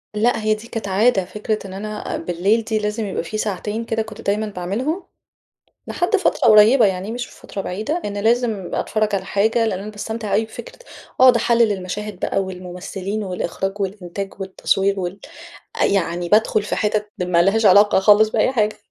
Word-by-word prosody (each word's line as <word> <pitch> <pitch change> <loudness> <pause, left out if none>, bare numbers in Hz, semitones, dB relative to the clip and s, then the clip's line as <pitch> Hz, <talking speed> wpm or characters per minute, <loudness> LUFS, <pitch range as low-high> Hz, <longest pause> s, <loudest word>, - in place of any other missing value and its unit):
لأ، 225 +2 +1
هي 215 0 +2
دي 215 +2 -7
كانت 225 -3 -5
عادة، 195 0 +2
فكرة 210 +3 -3
إن 185 - -9
أنا 210 +2 -5
أ - - -2
بالليل 180 +7 0
دي 220 0 -1
لازم 210 +1 -2
يبقى 190 -4 -3
في 215 +6 -5
ساعتين 215 +2 -3
كده 225 0 -1
كنت 220 -1 -8
دايمًا 210 +2 0
باعملهم، 215 - -3 0.8
لحد 355 +4 0
فترة 395 - +2
قريبة 220 +3 +7
يعني، 190 +2 -2
مش 245 +1 -4
في - - -17
فترة 195 - -6
بعيدة، 220 - -3
إن 205 0 -4
لازم 225 -2 0
أتفرَّج 215 -1 -1
على 190 -1 -1
حاجة، 220 +4 +1
لإن 195 -4 -1
أنا 205 +2 -7
باستمتع 215 0 -5
أوي 220 +2 +2
بفكرة 225 - -10 0.4
أقعد 255 -2 +8
أحلِّل 235 -1 +3
المَشاهد 200 +1 -5
بقى - - -1
والممثلين 190 +2 -5
والإخراج 195 +1 -4
والإنتاج 195 0 -5
والتصوير 195 +1 0
وال 180 +2 -4 0.6
أ - - +5
يعني 175 -3 0
بادخل 215 0 +3
في 210 - -3
حِتت 210 0 -1
ما 175 -1 +3
لهاش 210 +5 +2
علاقة 200 +1 +6
خالص 210 +2 +5
بأي 240 - +1
حاجة. 215 -4 0
210 Hz, 180 wpm, -20 LUFS, 195-220 Hz, 0.8 s, أقعد